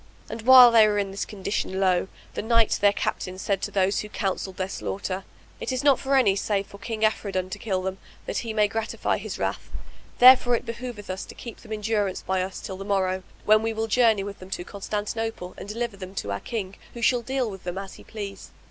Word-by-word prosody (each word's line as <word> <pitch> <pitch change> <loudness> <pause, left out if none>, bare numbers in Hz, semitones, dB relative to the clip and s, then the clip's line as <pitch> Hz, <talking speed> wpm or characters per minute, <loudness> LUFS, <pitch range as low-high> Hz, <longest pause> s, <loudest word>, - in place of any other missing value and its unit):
And 230 - -5
while 250 0 +9
they 225 -2 +7
were 210 -1 +1
in 200 -1 -1
this 195 - -3
condition, 195 -1 -3
lo! 185 -1 +2 0.3
the - - -3
knight 230 0 +3
their 205 0 +6
captain 185 -2 -3
said 195 0 -1
to - - -2
those 195 0 +1
who 210 - -5
counselled 190 -2 -3
their 185 - -1
slaughter, 190 0 -4 0.3
"It - - -3
is 255 0 -2
not 280 -3 +5
for 275 0 +1
any 220 -8 +4
save 200 0 0
for 200 - -13
King 220 -1 -4
Afridun 195 -4 -1
to - - -5
kill 190 -4 -1
them, 190 +1 -3 0.3
that - - -2
he 230 - -4
may 210 -1 +3
gratify 225 +2 -2
his - - -6
wrath; - - -3 0.5
therefore 250 -1 +8
it - - -3
behoveth 230 -4 -6
us 190 +1 -4
to - - -12
keep 235 - -9
them 220 - -14
in 215 -1 -3
durance 205 -3 -1
by 190 -1 0
us 185 0 -5
till 190 - -6
the 195 - -6
morrow, 190 -2 0 0.2
when 215 0 +6
we 225 0 -1
will 220 0 -1
journey 225 -2 +3
with 200 0 -7
them 185 - -11
to 185 - -4
Constantinople 210 0 -4
and 205 - -9
deliver 230 -1 -3
them 190 0 -9
to 100 - -3
our 100 - -2
King, 200 - -5 0.2
who 235 - -6
shall 245 +1 +3
deal 260 +1 -1
with 190 -2 -10
them 175 +1 -4
as 195 -1 -6
he - - -13
please." 205 -3 -7
205 Hz, 235 wpm, -25 LUFS, 190-225 Hz, 0.5 s, while